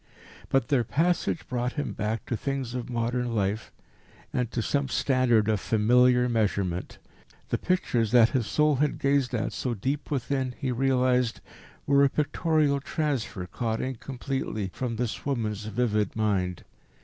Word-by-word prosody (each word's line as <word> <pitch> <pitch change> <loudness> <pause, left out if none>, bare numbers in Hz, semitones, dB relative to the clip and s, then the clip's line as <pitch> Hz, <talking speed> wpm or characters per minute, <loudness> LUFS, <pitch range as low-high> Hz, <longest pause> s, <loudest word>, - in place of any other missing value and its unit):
But 135 -1 +1
their 135 -5 +3
passage 165 +6 0
brought 125 0 -2
him 145 - -3
back 110 +1 -2
to 120 - -2
things 135 0 -3
of 125 0 -4
modern 120 0 -1
life, 105 +1 -1 0.6
and 125 -3 0
to 120 - -3
some 140 +3 0
standard 125 -4 +2
of 110 -2 +2
familiar 125 +4 +4
measurement. 100 -6 -1 0.5
The - - 0
pictures 120 - +1
that 120 -2 +6
his 125 -6 -1
soul 150 -2 +2
had 150 +2 +1
gazed 140 -3 +1
at 110 - -2
so 125 -2 -2
deep 135 +8 -3
within, 130 -2 -1
he 130 - -2
realised, 125 -1 +2 0.5
were 140 0 +4
a 140 - +5
pictorial 150 -1 +1
transfer 135 - -2
caught 110 +4 -2
incompletely 130 -5 -3
from 125 -3 -3
this 115 -1 -3
woman's 110 -6 -2
vivid 105 -2 0
mind. 95 -5 0
125 Hz, 150 wpm, -27 LUFS, 110-135 Hz, 0.6 s, that